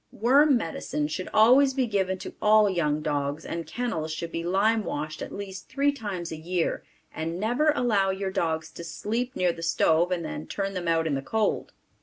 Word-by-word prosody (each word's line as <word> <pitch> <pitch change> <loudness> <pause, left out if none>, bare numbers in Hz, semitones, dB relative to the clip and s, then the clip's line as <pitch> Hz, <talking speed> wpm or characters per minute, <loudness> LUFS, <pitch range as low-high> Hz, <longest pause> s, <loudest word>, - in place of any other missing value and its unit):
Worm 275 +5 +4
medicine 160 -5 -3
should 155 +4 -4
always 260 +5 +5
be 265 -2 +2
given 190 -4 0
to - - -8
all 215 0 +5
young 155 -5 0
dogs 145 0 -2
and 165 -2 -5
kennels 160 -6 -3
should 165 +1 -5
be 165 - -3
lime 205 +5 +2
washed 155 -2 -4
at - - -5
least 195 -1 -7
three 280 +2 +2
times 200 -10 -5
a - - -3
year 170 +2 -2 0.3
and 165 +2 -4
never 245 +9 +2
allow 210 -7 +2
your 190 0 -2
dogs 160 -4 -1
to 170 - -9
sleep 230 +9 -3
near 180 -2 +2
the 165 - -10
stove 165 +1 +2
and 170 -2 -1
then 155 0 -6
turn 195 -1 -3
them 180 -2 -4
out 165 -1 +2
in 155 - 0
the 135 - -1
cold. 215 +9 -1
185 Hz, 200 wpm, -26 LUFS, 160-220 Hz, 0.3 s, always